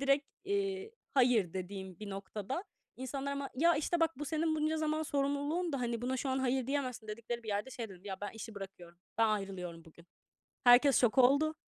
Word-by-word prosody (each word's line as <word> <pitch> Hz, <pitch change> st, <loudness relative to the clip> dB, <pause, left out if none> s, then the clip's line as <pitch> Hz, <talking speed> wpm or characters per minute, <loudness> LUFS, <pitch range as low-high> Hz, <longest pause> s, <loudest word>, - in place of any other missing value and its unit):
direkt, 275 Hz, +1 st, +3 dB, 0.2 s
eee, 395 Hz, +1 st, -1 dB, 0.2 s
"Hayır." 240 Hz, -9 st, +4 dB
dediğim 190 Hz, -1 st, -6 dB
bir 210 Hz, -1 st, -6 dB
noktada 205 Hz, -, -4 dB, 0.3 s
insanlar 270 Hz, +2 st, -3 dB
ama, 280 Hz, -1 st, -3 dB
ya, 335 Hz, +5 st, +4 dB
işte, 335 Hz, +3 st, 0 dB
bak: 325 Hz, -3 st, +2 dB
"Bu 295 Hz, -, -3 dB
senin 315 Hz, +1 st, +1 dB
bunca 310 Hz, +1 st, +1 dB
zaman 310 Hz, 0 st, 0 dB
sorumluluğundu, 285 Hz, +3 st, 0 dB
hani 235 Hz, -1 st, -2 dB
buna 260 Hz, +1 st, 0 dB
şu 270 Hz, -, -2 dB
an 260 Hz, -, +1 dB
hayır 260 Hz, -1 st, +1 dB
diyemezsin." 255 Hz, -5 st, -2 dB
dedikleri 235 Hz, +2 st, -4 dB
bir 220 Hz, -, -10 dB
yerde 210 Hz, +6 st, -1 dB
şey 230 Hz, -3 st, -5 dB
dedim: 190 Hz, 0 st, -13 dB
"Ya, 190 Hz, -2 st, -4 dB
ben 205 Hz, -, -3 dB
işi 225 Hz, 0 st, -8 dB
bırakıyorum, 180 Hz, -3 st, -9 dB, 0.2 s
ben 225 Hz, -1 st, +5 dB
ayrılıyorum 185 Hz, -5 st, -3 dB
bugün." 170 Hz, +2 st, -17 dB, 0.6 s
Herkes 250 Hz, +3 st, +7 dB
şok 245 Hz, +1 st, +3 dB
oldu. 285 Hz, +5 st, +5 dB
255 Hz, 190 wpm, -34 LUFS, 205-290 Hz, 0.6 s, Herkes